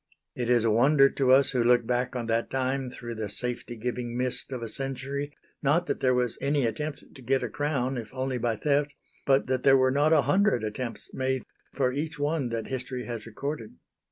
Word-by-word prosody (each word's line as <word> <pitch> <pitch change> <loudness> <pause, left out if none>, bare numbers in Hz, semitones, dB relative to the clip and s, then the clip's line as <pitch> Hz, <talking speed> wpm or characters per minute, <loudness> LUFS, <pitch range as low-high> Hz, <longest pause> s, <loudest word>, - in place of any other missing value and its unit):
It 120 -1 -2
is 120 -2 +4
a 115 - +3
wonder 135 +5 +5
to 130 -2 +2
us 135 +1 +6
who 125 -3 +1
look 120 0 +4
back 125 +2 -1
on 120 -2 -2
that 115 +1 0
time 130 0 -1
through 120 -1 -7
the 110 -2 -4
safety 120 +2 -4
giving 120 +1 -3
mist 125 +1 -1
of 125 -3 -4
a - - -3
century, 135 +3 -4 0.3
not 155 +5 +2
that - - -2
there 130 -1 +3
was 125 -2 0
any 140 -1 +1
attempt 145 +7 -4
to 135 - -13
get 130 +1 +1
a 120 - -2
crown, 135 -1 -1
if 110 -2 -8
only 130 -1 -2
by 115 -1 0
theft, 145 +2 0 0.3
but 135 0 +4
that 130 0 0
there 135 -1 +6
were 130 0 +3
not 145 +3 +3
a 155 -3 +5
hundred 200 - +2
attempts 110 +1 -5
made 130 0 -1 0.3
for 130 -2 +1
each 150 +2 -3
one 145 -2 0
that 115 -1 -3
history 125 -1 -4
has 115 -2 -6
recorded. 125 0 -5
130 Hz, 215 wpm, -27 LUFS, 120-140 Hz, 0.3 s, us